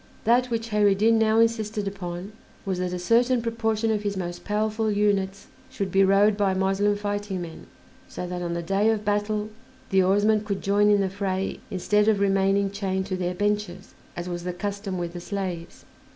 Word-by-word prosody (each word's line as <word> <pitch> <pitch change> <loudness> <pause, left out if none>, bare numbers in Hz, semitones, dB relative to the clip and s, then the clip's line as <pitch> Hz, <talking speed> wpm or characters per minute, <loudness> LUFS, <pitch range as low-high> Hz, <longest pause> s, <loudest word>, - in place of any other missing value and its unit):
That 245 +3 +3
which 230 -1 -3
Kheyr 210 -1 +3
ed 195 - +2
Din 225 +2 +4
now 220 0 +3
insisted 220 -2 +1
upon 180 0 -5 0.3
was 190 -2 -2
that 180 0 -2
a 180 - -2
certain 235 +7 +3
proportion 225 -1 -1
of 210 -1 0
his 205 -1 -3
most 175 -1 -5
powerful 215 +1 0
units 200 -1 0 0.2
should 200 -7 -4
be 195 +1 +4
rowed 200 +2 +4
by 200 -2 +1
Moslem 195 +2 +1
fighting 205 -1 -3
men, 165 -1 -10 0.4
so - - -6
that 180 0 -5
on 170 -1 -2
the 170 - -3
day 195 +5 +2
of 215 -1 0
battle 210 +1 -1 0.4
the 190 0 +5
oarsmen 205 +3 +3
could 200 -2 -4
join 205 +1 +3
in 205 -1 +4
the 195 - 0
fray 195 -1 -2
instead 210 +3 +1
of 215 -2 +3
remaining 195 0 +2
chained 190 -1 -2
to 185 - -3
their 180 -1 -2
benches, 205 -2 -2 0.2
as 175 +1 -4
was 175 -1 -4
the 180 0 -3
custom 200 +1 -4
with 175 -1 -4
the 175 - -7
slaves. 180 -3 -5
200 Hz, 195 wpm, -25 LUFS, 190-210 Hz, 0.4 s, the